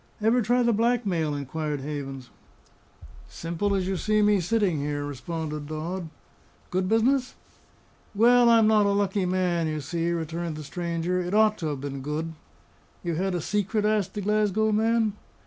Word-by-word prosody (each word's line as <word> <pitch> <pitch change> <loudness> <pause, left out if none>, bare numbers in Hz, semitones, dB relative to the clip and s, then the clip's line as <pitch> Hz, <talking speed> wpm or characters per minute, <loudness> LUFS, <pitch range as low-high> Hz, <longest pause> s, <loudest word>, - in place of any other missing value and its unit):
"Ever 225 +3 +3
try 245 +3 +2
the 235 -1 +3
blackmail?" 205 -9 +1
inquired 145 +1 -3
Havens. 135 -3 -6 1.0
"Simple 170 +5 -2
as 185 -2 -1
you 190 -1 -1
see 215 +3 +2
me 205 -1 +4
sitting 185 -3 +1
here!" 145 0 -2
responded 150 +1 -5
Dodd. 165 +3 -4 0.6
"Good 185 0 0
business?" 255 +4 +2 0.8
"Well, 240 +3 +6
I'm 230 -1 +6
not 215 -1 +4
a 200 - +2
lucky 195 -2 0
man, 180 -3 0
you 155 -1 -2
see," 165 +4 -2
returned 165 0 -3
the 155 - -7
stranger. 170 +3 -2
"It 180 +3 -2
ought 215 0 +4
to 160 - -2
have 145 -3 -3
been 140 -1 -5
good." 155 +4 -3 0.7
"You 170 - -1
had 185 +3 -1
a 175 - -1
secret?" 210 +3 -1
asked 210 -2 0
the 205 - -2
Glasgow 215 +1 +1
man. 220 0 +2
180 Hz, 165 wpm, -26 LUFS, 155-215 Hz, 1.0 s, Well